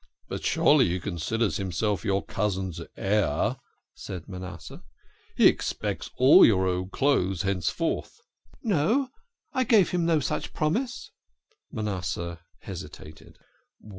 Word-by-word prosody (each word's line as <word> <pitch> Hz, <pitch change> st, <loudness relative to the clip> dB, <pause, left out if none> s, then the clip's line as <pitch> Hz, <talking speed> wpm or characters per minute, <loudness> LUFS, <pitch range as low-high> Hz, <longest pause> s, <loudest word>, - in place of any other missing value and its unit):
" -, -, -42 dB
But -, -, -5 dB
surely -, -, +4 dB
he 90 Hz, +2 st, -1 dB
considers 100 Hz, +2 st, -1 dB
himself 100 Hz, +2 st, -1 dB
your 100 Hz, -2 st, 0 dB
cousin's 95 Hz, -3 st, -2 dB, 0.2 s
heir," 105 Hz, +1 st, +1 dB, 0.4 s
said 90 Hz, -4 st, -8 dB
Manasseh. 90 Hz, -2 st, -8 dB, 0.3 s
" -, -, -34 dB
He -, -, +5 dB
expects -, -, +1 dB
all 130 Hz, +3 st, +8 dB
your 95 Hz, -4 st, +5 dB
old 90 Hz, 0 st, -1 dB
clothes 100 Hz, -9 st, +1 dB
henceforth." 95 Hz, -4 st, -2 dB, 0.3 s
" 70 Hz, -, -27 dB
No. 235 Hz, -, +1 dB, 0.4 s
I 260 Hz, -1 st, +2 dB
gave 220 Hz, -7 st, +4 dB
him 175 Hz, -2 st, 0 dB
no 165 Hz, -2 st, +3 dB
such 140 Hz, -, -3 dB
promise." 225 Hz, -, -2 dB, 0.6 s
Manasseh 95 Hz, -, -3 dB, 0.2 s
hesitated. 75 Hz, +1 st, -10 dB
100 Hz, 125 wpm, -26 LUFS, 90-145 Hz, 0.6 s, all